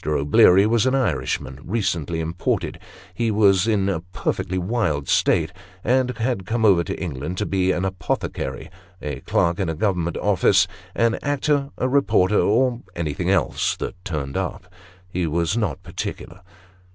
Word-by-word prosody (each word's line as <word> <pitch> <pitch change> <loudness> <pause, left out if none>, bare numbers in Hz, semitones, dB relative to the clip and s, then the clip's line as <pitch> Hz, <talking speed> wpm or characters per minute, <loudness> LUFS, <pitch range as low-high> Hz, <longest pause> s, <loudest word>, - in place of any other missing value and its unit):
O'Bleary 75 +6 +5
was 115 +2 +2
an 130 - +2
Irishman, 70 - -1
recently 85 -6 -1
imported; 85 +2 -2 0.3
he 115 +4 0
was 100 -2 +4
in 100 -3 +2
a 95 -4 0
perfectly 90 +1 -3
wild 90 - -1
state; - - +2 0.3
and 125 0 +1
had 115 -5 -2
come 115 0 +1
over 95 -5 +5
to - - -5
England 80 0 -4
to 105 - -1
be 95 -2 +1
an 90 +1 -1
apothecary, 90 -7 -3 0.3
a 70 -3 -5
clerk 85 +5 0
in 95 -4 0
a 80 - -2
government 85 -2 -1
office, 95 -2 +3 0.3
an 115 0 +2
actor, 145 -1 0
a 130 - 0
reporter, 105 -7 +3
or 120 +2 +2
anything 80 -4 -2
else - - +1
that - - -4
turned 75 -7 -4
up 90 0 -4 0.3
he 90 -2 -2
was 85 +4 0
not 100 -5 -2
particular. 90 0 -6
95 Hz, 150 wpm, -22 LUFS, 85-110 Hz, 0.3 s, O'Bleary